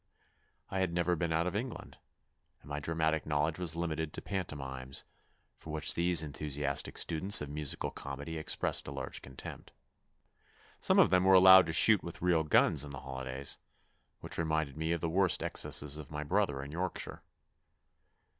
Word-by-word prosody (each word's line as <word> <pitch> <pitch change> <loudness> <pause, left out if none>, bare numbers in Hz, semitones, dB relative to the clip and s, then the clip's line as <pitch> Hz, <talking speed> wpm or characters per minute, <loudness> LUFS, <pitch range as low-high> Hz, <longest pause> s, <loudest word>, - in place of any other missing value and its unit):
I 95 - -1
had 95 -2 0
never 90 0 +1
been 85 0 -2
out 80 +1 +1
of 90 +1 -3
England, 120 +3 -6 0.6
and - - -15
my 75 0 -3
dramatic 80 0 -1
knowledge 75 +2 0
was 85 -3 -2
limited 80 -2 -3
to - - -6
pantomimes, 70 -8 -5 0.6
for - - -12
which 75 0 +1
these 85 -1 +3
enthusiastic 70 -1 -3
students 90 +5 +3
of 75 - -6
musical 75 -1 -3
comedy 70 +4 -6
expressed 80 - 0
a - - -5
large - - -6
contempt. 65 0 -10 1.1
Some - - +3
of - - +5
them 90 -1 +4
were 95 0 +6
allowed 95 -1 +8
to 80 - -3
shoot 105 +2 +6
with 85 - -8
real 85 -2 +2
guns 75 -1 +4
in 75 - -8
the 65 -2 -8
holidays, 65 0 -5 0.6
which - - -5
reminded 80 -3 -1
me 80 +1 -2
of 85 -2 -1
the 85 - -1
worst 90 0 +2
excesses 75 +1 +1
of 75 - -10
my 75 0 -5
brother 75 -4 0
in 70 - -9
Yorkshire. 90 +3 -4
80 Hz, 170 wpm, -32 LUFS, 75-90 Hz, 1.1 s, allowed